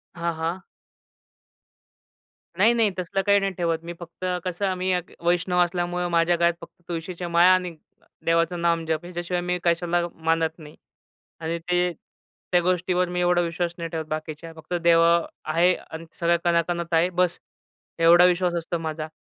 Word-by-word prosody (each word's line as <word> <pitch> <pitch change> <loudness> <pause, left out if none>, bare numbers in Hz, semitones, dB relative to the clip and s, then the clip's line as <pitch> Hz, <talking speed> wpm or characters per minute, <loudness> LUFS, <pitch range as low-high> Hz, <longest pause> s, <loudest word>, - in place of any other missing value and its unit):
हां, 170 -1 -2
हां. 165 +3 -3 2.0
नाही 220 +5 +5
नाही, 225 -3 +2
तसलं 185 +2 -1
काही 200 0 +5
नाही 195 0 -1
ठेवत 165 -2 -1
मी. 170 +1 -6
फक्त 175 +1 -8 0.2
कसं, 185 +2 -1
मी 185 +1 -1
एक 180 -1 -3
वैष्णव 180 +1 +1
असल्यामुळं 175 0 -2
माझ्या 170 +1 +3
गळ्यात 170 0 +2
फक्त 170 +1 -14
तुळशीच्या 175 +1 -5
माळा 175 +2 +6
आणि 180 -2 -1 0.5
देवाचं 165 +1 +1
नामजप 165 -1 0
ह्याच्याशिवाय 175 0 -3
मी 180 0 -1
कशाला 175 0 +1
मानत 160 0 -1
नाही 150 -1 -12 0.6
आणि 165 +1 -3
ते 180 +1 0 0.6
त्या 180 - +4
गोष्टीवर 180 0 0
मी 180 0 -2
एवढा 175 0 +3
विश्वास 170 0 -2
नाही 170 -1 -5
ठेवत 160 -1 -4
बाकीच्या. 155 +1 -6
फक्त 160 +2 -9
देव 170 -1 +4 0.4
आहे 170 +3 +3
आणि 160 +1 -10
सगळं 170 0 +3
कणाकणांत 170 0 0
आहे. 165 +2 +4
बस, 180 -1 0 0.6
एवढा 170 +2 +7
विश्वास 180 0 +2
असतो 170 +1 -3
माझा 155 -1 -4
175 Hz, 155 wpm, -24 LUFS, 165-180 Hz, 2.0 s, एवढा